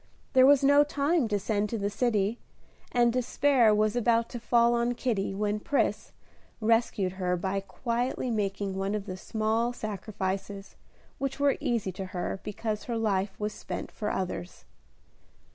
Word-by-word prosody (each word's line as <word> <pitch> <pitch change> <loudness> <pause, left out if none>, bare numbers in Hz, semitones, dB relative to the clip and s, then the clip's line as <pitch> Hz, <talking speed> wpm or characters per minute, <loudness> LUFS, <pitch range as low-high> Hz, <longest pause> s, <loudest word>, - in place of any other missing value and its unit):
There 260 -1 +7
was 280 -1 +6
no 285 +1 +6
time 295 -1 +1
to 210 -1 0
send 205 +1 -1
to 230 - -2
the 205 0 -2
city, 215 -1 0 0.5
and 240 -1 +3
despair 255 -1 +3
was 215 +1 +2
about 235 -1 +2
to 240 - -6
fall 235 0 +3
on 240 +1 +1
Kitty, 205 -6 -1
when 210 +1 -1
Pris 280 +6 0 0.5
rescued 225 -4 +1
her 180 -1 -1
by 190 +2 -1
quietly 240 +5 -2
making 200 -2 -1
one 195 +2 -1
of 205 -2 -4
the 185 -3 -5
small 220 +4 -1
sacrifices 195 -2 -4 0.4
which 275 0 -3
were 285 -1 +3
easy 230 -6 -1
to 190 +1 -6
her 180 - -2
because 210 0 -4
her 235 -2 -2
life 200 -3 -1
was 210 0 -2
spent - - -6
for 210 - -3
others. 180 -1 -4
215 Hz, 160 wpm, -28 LUFS, 195-240 Hz, 0.5 s, There